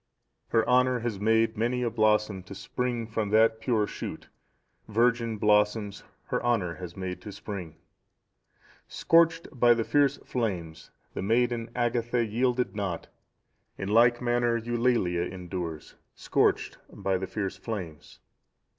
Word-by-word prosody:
"Her 115 -1 +1
honour 125 -1 +3
has 115 -4 -3
made 110 +1 +2
many 125 +2 0
a 120 - 0
blossom 105 -3 +2
to 100 - -9
spring 120 +4 -3
from 110 -2 -2
that 110 +1 +4
pure 110 -2 +1
shoot, - - -7 0.6
virgin 115 0 +1
blossoms 105 0 +1 0.2
her - - -2
honour 110 -8 +1
has 85 +1 -8
made 95 -1 -5
to 105 - -8
spring. 95 -6 -7 1.1
"Scorched 165 0 +3
by 120 -3 +4
the 115 - 0
fierce 145 +2 +2
flames, 85 -10 -3 0.2
the - - -4
maiden 115 +2 +1
Agatha(670) 120 -1 0
yielded 125 0 0
not; 95 -5 -3 0.7
in 95 - -4
like 120 +3 +4
manner 120 -1 +2
Eulalia 115 -6 0
endures, 90 -4 -6 0.2
scorched - - 0
by 95 -1 -1
the 95 - -4
fierce 95 -2 -4
flames. 95 -8 -7
110 Hz, 130 wpm, -28 LUFS, 100-120 Hz, 1.1 s, that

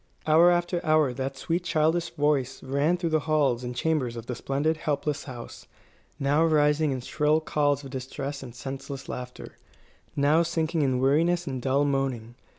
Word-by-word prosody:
Hour 160 +3 +6
after 175 0 0
hour 155 -4 +3
that 135 +2 -4
sweet 170 +5 -2
childish 165 +1 +1
voice 140 -3 0
rang 140 +6 +1
through 170 -2 -2
the 155 - +3
halls 135 -6 +2
and 125 0 -5
chambers 130 -4 0
of 115 -1 -7
the 125 - -4
splendid, 140 +6 -1
helpless 145 -1 -2
house, 120 -3 -9 0.5
now 145 +3 +2
rising 150 -1 +3
in 130 -1 -3
shrill 150 +4 +1
calls 145 -2 0
of 135 - -9
distress 135 +2 -5
and 125 -3 -10
senseless 135 +1 -7
laughter, 125 0 -8 0.6
now 145 +3 +3
sinking 165 -1 0
in 130 -3 +1
weariness 165 +6 +2
and 130 -4 -4
dull 135 +3 +2
moaning. 135 -5 -1
145 Hz, 165 wpm, -26 LUFS, 130-160 Hz, 0.6 s, Hour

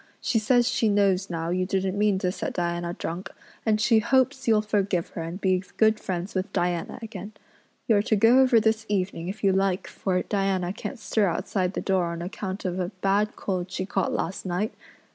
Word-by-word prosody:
She 225 - +1
says 240 +2 +3
she 225 - +2
knows 200 -2 +2
now 165 -1 -2
you 185 +1 +1
didn't 190 0 0
mean 205 -1 +2
to 185 -1 0
set - - -4
Diana 175 0 -2
drunk, 175 +3 -5 0.4
and 215 -1 +3
she 225 0 +4
hopes 260 +3 +1
you'll 215 -2 +4
forgive 200 -4 0
her - - -6
and 165 +3 -5
be 185 -2 +2 0.2
good 220 -1 +4
friends 180 +1 -4
with 190 +1 -2
Diana 175 -2 -1
again. 215 -2 -7 0.5
You're 215 -3 +4
to 220 +1 +1
go 225 +5 +5
over 255 -3 +6
this 220 0 +1
evening 185 -4 -1
if 200 +4 -6
you 195 - +5
like 190 -1 +1
for 185 -2 -1
Diana 195 -3 0
can't 255 - -6
stir 220 -2 +1
outside 185 +1 -1
the - - -2
door 190 -2 +1
on 170 0 -4
account 190 +2 -5
of 180 0 -2
a 180 -1 -1
bad 205 +2 +1
cold 185 -2 -3
she 185 0 -3
caught 195 -1 -1
last 180 - -3
night. 185 +4 -2
195 Hz, 200 wpm, -26 LUFS, 180-215 Hz, 0.5 s, over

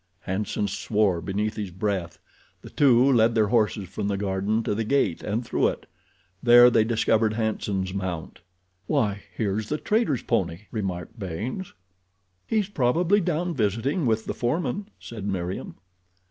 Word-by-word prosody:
Hanson 100 +2 -2
swore 100 -2 0
beneath 105 +4 -2
his 105 -3 -3
breath. 95 -1 -3 0.5
The - - -11
two 135 -1 +5
led 115 -1 +4
their 110 -2 +3
horses 105 -4 +1
from 100 +3 -4
the 100 -1 -1
garden 100 +3 -1
to - - -1
the 110 +2 -1
gate 110 -7 +1
and 110 +4 -2
through - - +1
it. - - -4 0.6
There 120 0 +8
they 115 -2 +4
discovered 110 -1 +2
Hanson's 105 -4 -2
mount. 95 -4 -4 0.5
"Why 105 -2 0
here's 105 0 -2
the 150 - 0
trader's 210 - 0
pony," 85 -1 -1
remarked 95 -1 -4
Baynes. 105 - -5 0.7
"He's 215 -3 +1
probably 175 +5 +2
down 175 0 -1
visiting 120 - 0
with 110 -1 +1
the - - -3
foreman," 175 - -2
said 110 -4 -7
Meriem. 95 -1 -4
110 Hz, 145 wpm, -25 LUFS, 100-125 Hz, 0.7 s, There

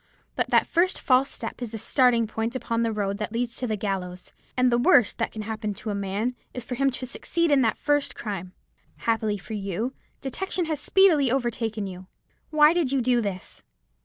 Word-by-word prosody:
But - - -1
that - - +4
first 350 +2 +1
false 260 0 +3
step 230 +1 -6
is 235 -2 -5
the - - -3
starting 240 0 +3
point 225 +3 -3
upon 230 -2 -1
the 230 -1 +1
road 200 -1 -2
that 210 0 -3
leads 235 +1 -2
to 250 - -2
the 215 - 0
gallows; 190 -3 -4 0.3
and 255 0 +4
the 240 - +3
worst 240 -2 +4
that 225 - 0
can 215 - -6
happen 215 -1 -4
to 215 - -5
a - - -2
man 200 +5 -2 0.2
is 250 - -4
for 250 - -6
him 275 +2 +2
to 255 0 -4
succeed 335 +6 -1
in 275 -2 +5
his 225 - +3
first 290 -1 0
crime. 190 -4 -5 0.5
Happily 220 -2 +1
for 200 - -9
you, 210 +5 -3 0.3
detection 355 +6 -2
has 310 -3 -2
speedily 320 -7 +4
overtaken 230 -4 -1
you. 185 -1 -8 0.4
Why 305 0 +6
did 335 -7 +1
you 275 - +2
do 245 -1 +2
this?' 195 -4 -5
235 Hz, 205 wpm, -25 LUFS, 210-265 Hz, 0.5 s, Why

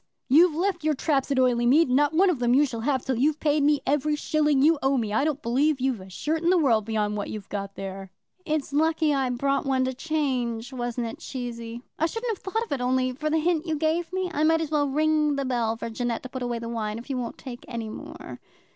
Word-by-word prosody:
"You've 320 +4 +5
left 355 -1 -1
your 310 -1 +2
traps 275 -1 0
at 275 - 0
Oileymead, 250 +4 +4
and 250 - 0
not 290 +1 +3
one 365 +4 +4
of 300 - -3
them 240 0 +3
you 290 +2 +5
shall 235 -4 -5
have 260 +2 -1
till 260 -3 -1
you've 300 +3 +2
paid 300 -1 +2
me 290 0 +3
every 295 +2 +1
shilling 295 -2 +1
you 315 0 +4
owe 270 0 +2
me. 220 -4 -2
I 220 - +2
don't 300 -1 -1
believe 270 +5 +2
you've 255 -5 -1
a 190 - -11
shirt 310 - -2
in 340 - +2
the 370 - +5
world 235 -10 +3
beyond 210 -1 -1
what 205 - -4
you've 210 -3 -7
got 200 -1 -5
there." 195 0 -7 0.3
"It's 305 -4 -2
lucky 315 0 +2
I 270 -2 +1
brought 275 +3 0
one 265 -1 +2
in - - +2
to 260 - -2
change; 255 -5 -2
wasn't 240 -1 -3
it, 225 - -6
Cheesy? 235 -2 -6 0.2
I 325 - +3
shouldn't 455 +4 -3
have - - -24
thought 440 +4 -1
of 465 - -11
it 275 -3 -1
only 255 +1 +1
for 305 +5 -3
the 315 - +2
hint 330 +1 0
you 320 - 0
gave 320 +3 0
me. 370 -1 -2
I 300 - 0
might 325 +1 +4
as 315 -2 -4
well 290 -2 +1
ring 305 +1 +2
the 275 -1 -2
bell 235 -3 0
for 230 - -5
Jeannette 235 0 -2
to 255 - -7
put 260 0 -6
away 245 -1 -2
the 230 0 -6
wine, 220 -2 -3
if 235 - -9
you 270 -3 -2
won't 235 -2 -5
take 245 -3 -9
any 230 -3 -5
more." - - -9
270 Hz, 260 wpm, -26 LUFS, 240-310 Hz, 0.3 s, You've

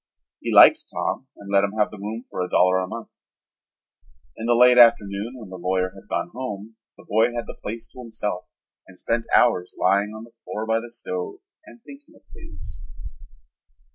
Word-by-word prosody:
He - - -4
liked - - +8
Tom 135 - -3
and 100 0 -10
let 100 0 +4
him 100 0 -1
have 105 -1 +1
the 105 - -10
room 110 +4 -6
for - - -5
a 90 - -2
dollar 90 +1 +4
a 95 - -3
month. - - -7 1.3
In 115 - -5
the 120 - +4
late 125 +1 +6
afternoon 110 0 +4
when 110 -6 -10
the 95 - -8
lawyer 95 +1 0
had - - -16
gone - - -2
home 110 -3 -6 0.2
the - - -16
boy 115 +3 +2
had 120 0 -3
the - - -10
place 115 +2 -6
to - - -15
himself 105 -6 -4 0.4
and 90 - -16
spent 115 +3 -2
hours 90 -7 +3
lying 100 +3 +2
on 110 - -8
the 115 - -16
floor 110 - -5
by 110 0 +1
the 120 +1 -9
stove 90 -6 -5 0.3
and 240 -8 -16
thinking 290 +4 -15
of - - -22
things. 85 -1 -11
110 Hz, 195 wpm, -23 LUFS, 95-120 Hz, 1.3 s, liked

